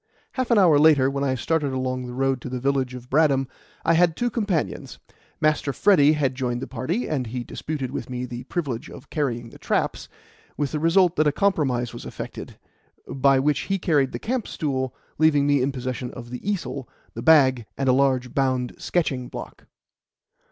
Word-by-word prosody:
Half 255 -2 -2
an 235 - +4
hour 170 -7 +6
later, 145 -3 +5
when 140 0 -2
I 130 -2 +1
started 145 +1 -1
along 130 -1 -2
the 125 - -7
road 135 -1 0
to 125 - -6
the 125 0 -3
village 130 -1 0
of 125 0 -10
Bradham, 135 -2 +3 0.4
I 165 - +4
had 170 -1 +3
two 240 0 0
companions. 205 -8 -2 0.4
Master 155 -2 +1
Freddy 155 -7 +5
had 140 -4 0
joined 125 -2 -2
the 130 - -4
party, 135 - -3
and 135 -6 -2
he 120 +2 -4
disputed 135 -1 -5
with 140 - -5
me 125 0 -3
the 120 0 -7
privilege 140 -8 -3
of - - -13
carrying 120 -6 -2
the - - -14
"traps," - - -1 0.5
with 145 -2 -1
the 150 - -2
result 175 +2 +3
that 155 - +4
a - - +4
compromise 140 - 0
was - - -8
effected, - - -8 0.5
by 135 0 +3
which 145 +2 +2
he 195 - +2
carried 145 -7 +1
the - - -4
camp 245 0 -2
stool, 130 -4 -2 0.2
leaving 150 -3 +4
me 145 -2 +3
in 135 +2 +1
possession 125 -1 -4
of 120 -1 -9
the 125 - -6
easel, 140 -9 -4 0.2
the - - -6
bag, 130 -7 +5
and 135 - -1
a 130 - +5
large 130 -2 +1
bound 130 -3 0
sketching 135 -8 -1
block. - - -9
135 Hz, 195 wpm, -24 LUFS, 130-155 Hz, 0.5 s, hour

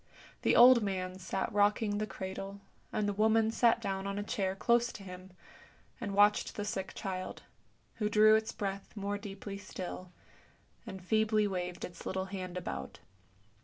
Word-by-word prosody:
The - - +3
old 245 0 +9
man 185 -2 -3
sat 190 +2 -3
rocking 205 0 +2
the 215 - -1
cradle, 195 0 -6 0.3
and 210 - 0
the 205 - 0
woman 220 +2 +3
sat 230 0 +3
down 195 0 -3
on 200 0 -3
a 205 - -2
chair 195 -4 -1
close 235 +3 +2
to 200 - -9
him 185 0 -9 0.7
and 200 -4 -3
watched 205 +1 +4
the 205 - -3
sick 195 -3 -4
child, 185 -3 -5 0.5
who 210 -1 0
drew 215 +1 +6
its 220 0 +2
breath 195 0 -5
more 200 0 -2
deeply 200 -1 -7
still, 185 -2 -7 0.8
and 190 -2 -8
feebly 215 0 +2
waved 180 -2 -3
its 175 -1 -11
little 190 0 -2
hand 185 -2 -5
about. 65 - -5
200 Hz, 165 wpm, -32 LUFS, 190-215 Hz, 0.8 s, old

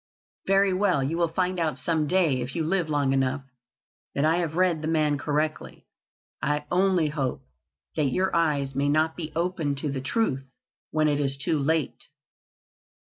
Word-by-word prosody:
"Very 195 0 +4
well, 185 -7 +2
you 145 +5 -1
will 170 0 +2
find 180 +2 -1
out 155 -5 0
some 150 +3 0
day, 160 -7 +2
if 125 +2 -5
you 165 - 0
live 170 0 0
long 145 -3 +1
enough, 135 +1 0 0.7
that 140 - +2
I 160 +2 +3
have 165 -3 -2
read 180 -3 +2
the 155 - -3
man 155 -2 +2
correctly. 150 +3 -2 0.6
I 150 0 0
only 180 -3 +3
hope 140 -4 -3 0.5
that 155 - +1
your 185 +8 0
eyes 145 -5 +1
may 140 +2 +1
not 155 +2 +2
be 160 -3 -5
opened 165 -4 -1
to 145 +1 -2
the 135 -1 -3
truth 135 - 0 0.5
when 155 0 +2
it 145 -1 +1
is 135 -1 -1
too 145 +2 0
late." 155 0 -1
155 Hz, 175 wpm, -26 LUFS, 140-170 Hz, 0.7 s, Very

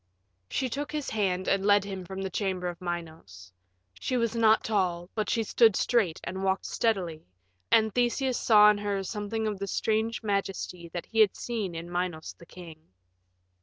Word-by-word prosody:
She 265 - -1
took 285 +4 -4
his 300 -2 -3
hand 185 -4 0
and 195 0 +2
led 205 0 +4
him 190 -2 -6
from 190 +2 -6
the 190 - -4
chamber 185 -2 -2
of 175 0 -6
Minos. 160 - -7 0.5
She 255 - -1
was 235 -1 0
not 220 -1 +4
tall, 180 -4 -1
but 215 -2 -2
she 225 - +1
stood 220 -1 +4
straight 205 -9 +1
and 190 +2 -5
walked 190 0 0
steadily, 180 - -1 0.4
and 220 -2 +4
Theseus 245 +1 +1
saw 210 -2 +7
in 205 - -2
her 200 -1 -2
something 210 +2 -3
of 210 -2 -2
the 200 - -3
strange 220 +3 -1
majesty 195 -4 -3
that 170 +1 -5
he 225 - -3
had 210 -3 +5
seen 215 -7 -4
in 165 +1 -6
Minos 175 -3 -3
the 170 - -16
king. 165 -3 -12
200 Hz, 180 wpm, -28 LUFS, 180-220 Hz, 0.5 s, saw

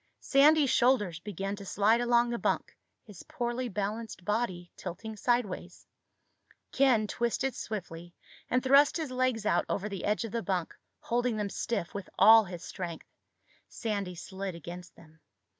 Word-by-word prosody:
Sandy's 285 0 +5
shoulders 210 -10 +2
began 195 +1 -4
to 200 - -9
slide 210 +4 +2
along 240 0 +3
the 235 - -2
bunk, - - -1 0.3
his 205 -6 -12
poorly 240 +1 -3
balanced 210 -1 -4
body 205 -5 -2
tilting 215 +5 -7
sideways. 210 -6 -2 0.9
Ken 255 -5 +3
twisted 240 +4 -1
swiftly 175 -5 -7 0.3
and 250 +1 +1
thrust 280 +4 +5
his 315 -5 -4
legs 255 -4 0
out - - +2
over 205 +1 -1
the 200 -3 -6
edge 210 +3 0
of 225 - -7
the 230 - -2
bunk, 185 -3 -2 0.3
holding 240 -1 0
them 205 -2 -2
stiff 205 -7 -3
with 200 -2 -6
all 220 +2 +8
his 175 -2 -8
strength. 175 -3 -6 0.6
Sandy 200 -5 -3
slid 190 +1 -6
against 175 +2 -9
them. 160 0 -19
210 Hz, 150 wpm, -30 LUFS, 185-240 Hz, 0.9 s, all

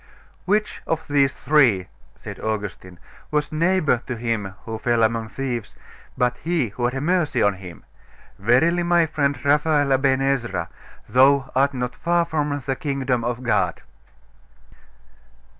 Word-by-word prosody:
'Which 210 +2 0
of 160 0 -2
these 140 -2 +2
three,' 125 -12 +3 0.3
said - - -9
Augustine, 100 -4 -5 0.3
'was 150 -1 -1
neighbour 160 -5 +2
to 125 - -3
him 110 -5 -3
who 110 -1 -5
fell 120 0 +1
among 110 0 0
thieves, 125 -3 -4 0.4
but 125 0 +1
he 160 -8 -1
who 120 +4 -3
had 135 +3 -3
mercy 160 -7 +1
on 100 - +3
him? 90 -2 -11 0.5
Verily, 130 - +3
my 175 -1 +3
friend 145 -3 -1
Raphael 145 -1 +3
Aben 135 0 +2
Ezra, 120 -11 -1 0.4
thou 135 +2 +4
art 135 +1 +2
not 125 -1 -3
far 170 0 +1
from 150 -4 -2
the 135 - -1
kingdom 135 -4 -1
of 120 +1 -3
God. 120 - 0
135 Hz, 140 wpm, -22 LUFS, 115-150 Hz, 0.5 s, thou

